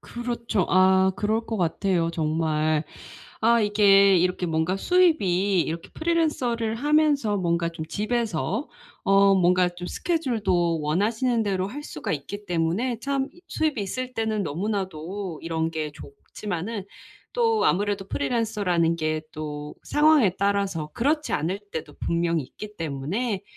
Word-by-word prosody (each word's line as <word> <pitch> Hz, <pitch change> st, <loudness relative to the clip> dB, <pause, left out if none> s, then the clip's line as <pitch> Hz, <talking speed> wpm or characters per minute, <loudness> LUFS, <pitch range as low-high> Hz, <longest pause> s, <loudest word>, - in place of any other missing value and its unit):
그렇죠. 235 Hz, -5 st, -2 dB
아 190 Hz, +1 st, +4 dB
그럴 220 Hz, +2 st, 0 dB
것 225 Hz, -, -2 dB
같아요 175 Hz, -1 st, 0 dB
정말. 155 Hz, -1 st, 0 dB, 0.6 s
아 235 Hz, +1 st, +4 dB
이게 200 Hz, -2 st, +5 dB
이렇게 180 Hz, +1 st, +1 dB
뭔가 160 Hz, +3 st, 0 dB
수입이 200 Hz, -, +3 dB
이렇게 165 Hz, 0 st, -4 dB
프리랜서를 265 Hz, -9 st, 0 dB
하면서 290 Hz, -5 st, +2 dB
뭔가 170 Hz, -2 st, 0 dB
좀 165 Hz, -1 st, -6 dB
집에서 215 Hz, -, -2 dB, 0.4 s
어 195 Hz, 0 st, +5 dB
뭔가 180 Hz, -1 st, +4 dB
좀 175 Hz, 0 st, -8 dB
스케줄도 200 Hz, -, 0 dB
원하시는 220 Hz, -, +1 dB
대로 190 Hz, -2 st, -1 dB
할 290 Hz, +8 st, -7 dB
수가 150 Hz, -, -5 dB
있기 205 Hz, +8 st, -6 dB
때문에 180 Hz, +9 st, 0 dB
참 275 Hz, +1 st, -1 dB, 0.2 s
수입이 305 Hz, -7 st, -1 dB
있을 255 Hz, +6 st, -4 dB
때는 220 Hz, -2 st, -1 dB
너무나도 185 Hz, 0 st, -4 dB
이런 165 Hz, 0 st, -1 dB
게 155 Hz, -2 st, -3 dB
좋지만은 210 Hz, -, -6 dB, 0.5 s
또 455 Hz, -2 st, +2 dB
아무래도 200 Hz, 0 st, +1 dB
프리랜서라는 180 Hz, -4 st, 0 dB
게 155 Hz, -1 st, -1 dB
또 150 Hz, -1 st, -6 dB
상황에 295 Hz, -, +4 dB
따라서 200 Hz, -6 st, 0 dB
그렇지 300 Hz, +5 st, 0 dB
않을 185 Hz, +6 st, -1 dB
때도 150 Hz, -2 st, -6 dB
분명히 170 Hz, -1 st, 0 dB
있기 210 Hz, +10 st, -10 dB
때문에 170 Hz, -, -2 dB
195 Hz, 295 characters per minute, -25 LUFS, 165-230 Hz, 0.6 s, 이게